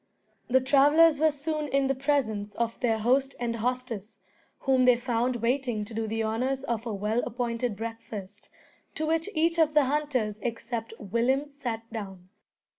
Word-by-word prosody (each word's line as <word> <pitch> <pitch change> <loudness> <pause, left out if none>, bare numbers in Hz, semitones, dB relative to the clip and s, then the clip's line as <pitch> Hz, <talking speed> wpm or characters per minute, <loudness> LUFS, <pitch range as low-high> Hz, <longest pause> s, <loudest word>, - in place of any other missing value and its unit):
The 260 +1 +4
travellers 290 +4 +5
were 315 +1 +5
soon 300 +1 -3
in 275 0 +1
the 270 - +2
presence 250 -7 -1
of 230 -1 -2
their 225 -3 +1
host 260 +5 +1
and 235 -1 -2
hostess, 230 -3 -3 0.4
whom 260 -1 +3
they 250 -1 +7
found 240 0 0
waiting 240 -3 0
to 225 - -10
do 220 0 -2
the 225 +1 -1
honours 255 +5 -1
of 235 -3 -3
a - - -2
well 210 +4 0
appointed 235 -1 -2
breakfast, 225 -3 -7 0.5
to 315 - -1
which 325 +4 0
each 330 +2 +2
of 310 -2 +3
the 300 - +6
hunters 260 -7 -1
except 230 -1 -4
Willem 240 +7 0
sat 240 -6 -5
down. 190 -4 -7
245 Hz, 165 wpm, -28 LUFS, 225-275 Hz, 0.5 s, they